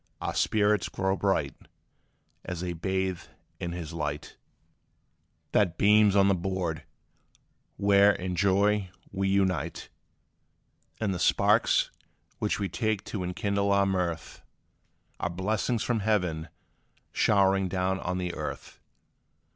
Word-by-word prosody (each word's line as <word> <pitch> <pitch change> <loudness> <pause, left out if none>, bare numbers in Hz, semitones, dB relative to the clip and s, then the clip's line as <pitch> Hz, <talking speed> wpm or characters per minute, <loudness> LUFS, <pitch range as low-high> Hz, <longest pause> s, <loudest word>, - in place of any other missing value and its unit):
Our - - -3
spirits 105 -2 +2
grow 95 0 -1
bright 95 -8 0 0.9
As 90 -2 -5
they 90 -1 -3
bathe 95 +1 -2 0.4
in 85 - -4
his 85 -2 -6
light, 75 -2 -4 1.2
That 90 -6 +2
beams 105 0 +5
on 100 -1 +5
the 100 - +4
board 90 -3 -2 1.0
where 100 0 +5
in 90 -2 -3
joy 100 +1 +2 0.2
we 95 0 -1
unite: 90 -5 0 1.1
And 105 -3 0
the 90 - -4
sparks, - - +3 0.5
which 105 - -1
we 100 - -1
take 110 +2 -1
to 100 -4 -5
enkindle 100 +2 -1
our 100 0 +4
mirth, 90 -4 -2 0.8
Are 90 - -1
blessings 105 +6 -1
from 120 -2 0
heaven 90 -7 0 0.6
showering 95 -2 +3
down 95 +1 -1
on 90 0 -3
the 90 -1 -3
earth. - - -6
95 Hz, 120 wpm, -28 LUFS, 90-100 Hz, 1.2 s, beams